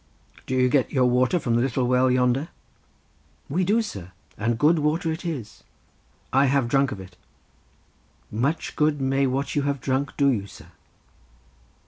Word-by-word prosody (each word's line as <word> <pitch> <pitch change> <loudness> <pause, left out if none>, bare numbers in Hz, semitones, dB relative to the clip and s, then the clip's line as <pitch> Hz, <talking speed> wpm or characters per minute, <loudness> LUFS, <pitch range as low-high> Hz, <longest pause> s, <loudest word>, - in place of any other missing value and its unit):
"Do 130 - -1
you 125 0 +3
get 130 0 +1
your 130 -3 +2
water 125 +7 +2
from 125 -8 -1
the 120 - +2
little 130 0 0
well 125 +1 +3
yonder?" 125 +4 +1 1.0
"We 180 +6 0
do, 215 +5 +2
sir, 95 - -8 0.2
and 115 +2 -1
good 155 +6 +3
water 160 +2 0
it 160 - -5
is." 130 -11 -6 0.7
"I 135 +1 +4
have 135 -2 +2
drunk 135 +1 +2
of 100 - -6
it." 90 -1 -12 1.2
"Much 135 +9 -2
good 150 -1 +1
may 135 0 +1
what 135 +2 -2
you 145 - +2
have 140 0 -1
drunk 135 +3 -2
do 140 -1 +4
you, 100 -5 -2
sir!" - - -15
135 Hz, 165 wpm, -24 LUFS, 125-145 Hz, 1.2 s, I